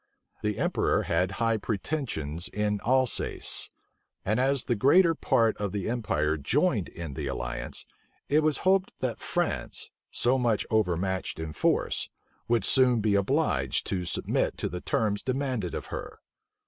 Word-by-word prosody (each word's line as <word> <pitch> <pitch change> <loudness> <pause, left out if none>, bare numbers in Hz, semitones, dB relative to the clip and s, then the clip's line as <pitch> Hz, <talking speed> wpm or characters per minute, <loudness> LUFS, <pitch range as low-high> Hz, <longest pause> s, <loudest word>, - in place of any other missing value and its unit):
The 105 -1 -1
emperor - - +1
had 90 +3 0
high 115 0 +1
pretensions 100 - -3
in 105 0 -1
Alsace; 130 0 +1 0.6
and 110 +5 +1
as 135 0 +2
the 120 - 0
greater 165 - +5
part 115 -7 +2
of 100 -2 -3
the 100 -3 -2
empire 80 -10 0
joined 110 - +1
in 85 -4 -7
the 70 +1 -4
alliance, - - -4 0.4
it 150 +2 +4
was 155 -1 +2
hoped 190 0 +2
that 120 -4 -2
France, - - -2 0.2
so 130 +2 +2
much 115 -4 +1
overmatched 95 -3 0
in 80 -1 -4
force, - - 0 0.4
would 115 -4 +2
soon 125 -3 +4
be 105 -1 +1
obliged 100 - +1
to 90 -2 -1
submit - - 0
to - - -2
the 90 +1 -5
terms 105 -2 0
demanded 130 -8 -2
of - - -4
her. - - -6
110 Hz, 150 wpm, -28 LUFS, 90-130 Hz, 0.6 s, greater